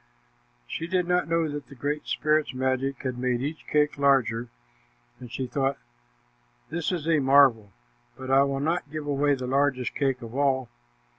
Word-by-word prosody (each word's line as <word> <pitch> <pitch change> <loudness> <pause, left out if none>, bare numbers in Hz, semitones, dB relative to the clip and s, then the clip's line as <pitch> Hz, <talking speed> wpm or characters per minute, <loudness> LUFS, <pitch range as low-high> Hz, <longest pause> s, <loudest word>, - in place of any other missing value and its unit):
She 165 - -5
did 180 0 0
not 180 0 +1
know 165 -1 +1
that 145 -1 -6
the 140 - -13
Great 145 +4 -3
Spirit's 155 -2 +1
magic 130 +2 -1
had 130 -2 -3
made 125 -1 0
each 150 +3 -5
cake 150 -1 +1
larger, 125 -4 +2 0.7
and 125 -2 -10
she 130 +2 -3
thought, 135 +2 -1 0.9
"This 170 +1 -1
is 165 -4 -3
a 160 -2 +3
marvel, 135 -7 +4 0.5
but 130 0 -5
I 135 +1 +6
will 135 0 -2
not 160 0 -1
give 155 0 -5
away 145 0 +2
the 130 -1 -5
largest 135 -1 0
cake 135 -3 -1
of 115 0 -9
all." 135 -2 +1
140 Hz, 170 wpm, -26 LUFS, 130-150 Hz, 0.9 s, I